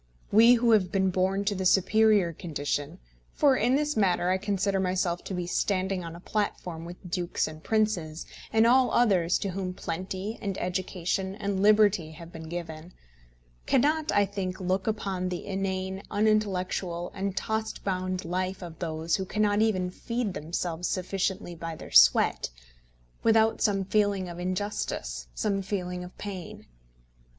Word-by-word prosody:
We 230 +4 +7
who 235 0 +3
have 190 -5 +3
been 190 -1 +2
born 190 +2 0
to 205 - +1
the 190 -1 -3
superior 200 -1 +4
condition, 145 -3 -3 0.4
for 280 -3 +4
in 250 +2 +2
this 300 0 0
matter 185 -3 +2
I 190 - +1
consider 200 -1 0
myself 180 -2 0
to 190 - -4
be 180 -1 -2
standing 185 +1 0
on 165 0 -7
a - - -10
platform 175 -4 -3
with 175 0 -10
dukes 175 -1 -1
and 155 0 -10
princes, 190 -8 0 0.3
and 225 +1 +4
all 255 +2 +5
others 185 -7 +3
to 200 - -3
whom 185 -1 -4
plenty 185 +6 -4
and 195 -2 -3
education 185 +1 -2
and 200 -2 -2
liberty 205 -6 +4
have 165 +1 -11
been 160 -1 -9
given, 170 0 -6 0.7
cannot, 305 +4 +2
I 205 - +4
think, 190 -2 -4
look 185 +1 -1
upon 195 -4 -1
the 180 -1 -5
inane, 190 0 -3
unintellectual, 190 -5 0
and 195 0 -3
tost 220 0 -2
bound 185 -1 -2
life 185 +2 -2
of 165 -2 -9
those 160 -1 -1
who 190 - -3
cannot 210 +1 +1
even 185 -5 +1
feed 230 +1 -3
themselves 170 +1 -3
sufficiently 185 -1 -2
by 165 -1 -6
their - - -11
sweat, - - +5 0.7
without 225 0 +3
some 195 -3 +2
feeling 200 -2 +1
of 175 0 -8
injustice, 180 - -3
some 200 -2 0
feeling 180 -2 -3
of 180 - -11
pain. 190 -4 -7
190 Hz, 155 wpm, -28 LUFS, 175-205 Hz, 0.7 s, We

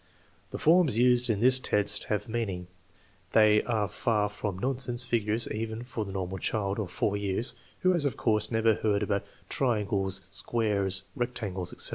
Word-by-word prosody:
The - - -5
forms 160 - +4
used 125 0 +4
in 105 -2 0
this 130 +2 +5
test 105 -5 +1
have 105 -1 -2
meaning. 110 -6 -3 0.7
They 105 -1 +6
are 110 -4 0
far 105 -1 0
from 100 -2 -4
nonsense 125 +1 -1
figures 110 -1 0
even 110 +1 -4
for 115 -3 -4
the 95 - -7
(normal) 95 0 -4
child 100 +2 -1
of 100 -5 -3
4 100 +3 -1
years, 100 +4 -1 0.3
who 185 0 +4
has, 170 -4 +1
of 140 - -1
course, 105 -2 +1
never 110 -1 +3
heard 105 -1 0
about 100 -1 -1
" - - -31
triangles," 100 -6 0
" - - -33
squares," 100 -1 0
" - - -35
rectangles/' 105 -8 -3
etc. - - -1
110 Hz, 180 wpm, -28 LUFS, 100-120 Hz, 0.7 s, They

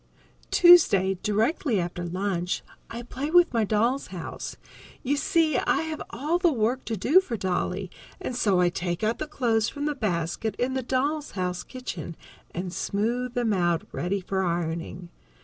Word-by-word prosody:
_ - - -38
Tuesday, 195 - +6
directly 220 - +1
after 175 0 -3
lunch, 180 0 -2 0.3
I 235 +1 -6
play 265 +4 -4
with 350 -1 +5
my 230 -2 +2
doll's 230 +6 +1
house. 180 -3 -7 0.5
You 275 +3 +1
see, 320 -4 +2
I - - +1
have 315 -1 -5
all 300 +8 -1
the 350 -2 +4
work 245 0 0
to 225 - -2
do 295 - +5
for 245 -12 -4
Dolly, 185 0 -2 0.3
and 250 - -4
so 200 -6 +2
I 175 -1 +4
take 175 +2 -3
out 220 +2 0
the 310 - -3
clothes 230 -6 +1
from 290 0 -5
the 300 - 0
basket 200 - -2
in 255 +2 -1
the 260 - -1
doll's 280 +4 -1
house 180 -1 -1
kitchen, 185 - -7 0.3
and 180 +1 -5
smooth 235 +6 -1
them 235 -3 +1
out, 175 -3 +1
ready 190 +3 -2
for 190 +1 -2
ironing. 170 0 -3
220 Hz, 170 wpm, -26 LUFS, 180-265 Hz, 0.5 s, Tuesday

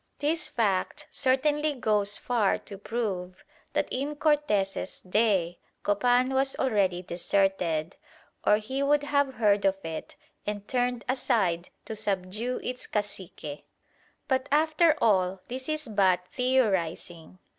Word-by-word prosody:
This 315 +3 0
fact 225 +7 -1
certainly 295 +3 +1
goes 210 -4 +1
far 230 -5 +1
to 200 -2 -10
prove 195 -5 -3 0.3
that - - +1
in 285 +3 -2
Cortes's 290 -12 0
day 185 -3 +1 0.2
Copan 245 +5 +2
was 270 0 +2
already 195 -8 +1
deserted, 175 -2 0 0.5
or 210 - +5
he 260 +6 -3
would 290 +1 +3
have 285 -2 +1
heard 205 -3 +3
of 195 0 +2
it 160 -1 -6 0.3
and 205 -1 -4
turned 245 -1 0
aside 210 -10 +1 0.2
to 220 - -5
subdue 210 +3 -2
its 250 0 -5
cacique. 190 -7 -5 0.6
But 260 -2 +1
after 315 +1 +4
all, 190 -4 +2
this 260 +3 -5
is 310 -2 -1
but 190 -4 +3
theorising. 190 -9 0
215 Hz, 125 wpm, -28 LUFS, 190-265 Hz, 0.6 s, or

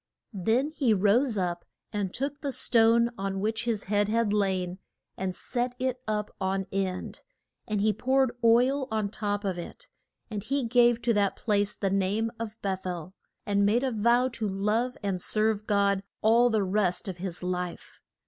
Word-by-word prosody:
Then 225 - +1
he 265 -9 +2
rose 215 +5 +3
up 175 -2 -1 0.3
and 200 -3 -2
took 280 +5 -4
the 280 - -2
stone 235 -1 +4
on 195 0 -2
which 220 +3 -1
his 225 -4 -1
head 205 +1 +1
had 225 -1 +1
lain 190 -3 0 0.4
and 185 -1 -3
set 245 +4 -2
it 255 0 -2
up 210 -1 -2
on 190 0 0
end, 190 -1 -3 0.5
and 210 -2 -1
he 215 +1 +3
poured 260 +3 +2
oil 255 +4 +4
on 215 -2 -1
top 205 0 -2
of 190 -3 -2
it. - - -9 0.4
And 210 -3 -4
he 275 +4 -1
gave 240 0 +3
to 235 - +3
that 200 -2 +1
place 205 -2 0
the 195 -2 -1
name 200 +4 0
of 220 -1 -6
Beth 190 -1 -2
el, 180 0 -5 0.3
and 200 0 +2
made 220 +5 +3
a 265 - 0
vow 235 +3 +3
to 235 -3 -3
love 210 +6 0
and 190 -3 -1
serve 215 +1 0
God 200 -2 +2 0.2
all 235 +3 +5
the 220 -3 +1
rest 190 -1 0
of 185 -2 -5
his 180 -1 -4
life. 180 -1 -4
210 Hz, 175 wpm, -28 LUFS, 195-235 Hz, 0.5 s, all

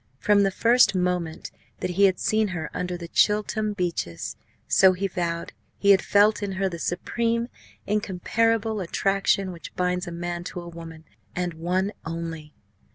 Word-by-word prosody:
From 205 +6 +3
the 195 - +3
first 235 +2 +4
moment 180 -2 -1 0.3
that - - -2
he 200 +3 +4
had 190 -2 +3
seen 215 0 +1
her 175 -4 -5
under 180 0 -3
the 170 -1 -8
Chiltern 210 +3 +1
beeches, 170 - -3 0.3
so 190 -1 +6
he 190 +2 -3
vowed, 170 -3 -3 0.2
he 200 - +4
had 190 - +6
felt 210 +1 +3
in 200 -1 -3
her 190 +1 0
the 170 -3 -5
supreme, 230 +8 -1 0.4
incomparable 215 +2 0
attraction 195 +1 +1
which 170 -2 -10
binds 180 0 -1
a - - -5
man 175 0 -4
to 180 - -5
one 175 0 -8
woman, 165 -1 -10 0.3
and 180 -1 -2
one 180 +5 -1
only. 165 -2 -6
185 Hz, 160 wpm, -25 LUFS, 170-205 Hz, 0.4 s, so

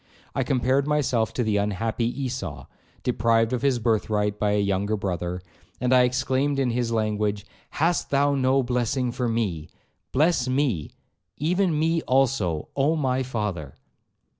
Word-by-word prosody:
I - - 0
compared 130 +1 +1
myself 130 -7 +1
to 125 - 0
the 110 -2 +1
unhappy 110 +3 -1 0.2
Esau, 130 0 -4 0.4
deprived 115 -1 +2
of 125 - -1
his 135 -2 +2
birthright 105 -2 0
by 105 -1 +1
a 105 - +2
younger 100 +1 0
brother, 90 -2 -3 0.4
and 125 +1 +1
I 130 - +7
exclaimed 130 +2 0
in 130 -3 +1
his 120 -1 -1
language, 105 -2 -1 0.2
'Hast 165 +3 0
thou 140 +1 +2
no 135 0 +2
blessing 125 +1 0
for 125 0 -2
me! 100 -9 -2 0.4
Bless 150 -2 +2
me, 130 - 0 0.5
even 175 +2 +1
me 165 +2 +1
also, 125 - +1
Oh 140 +4 +2
my 130 -4 0
father!' 105 - -4
125 Hz, 145 wpm, -25 LUFS, 105-135 Hz, 0.5 s, I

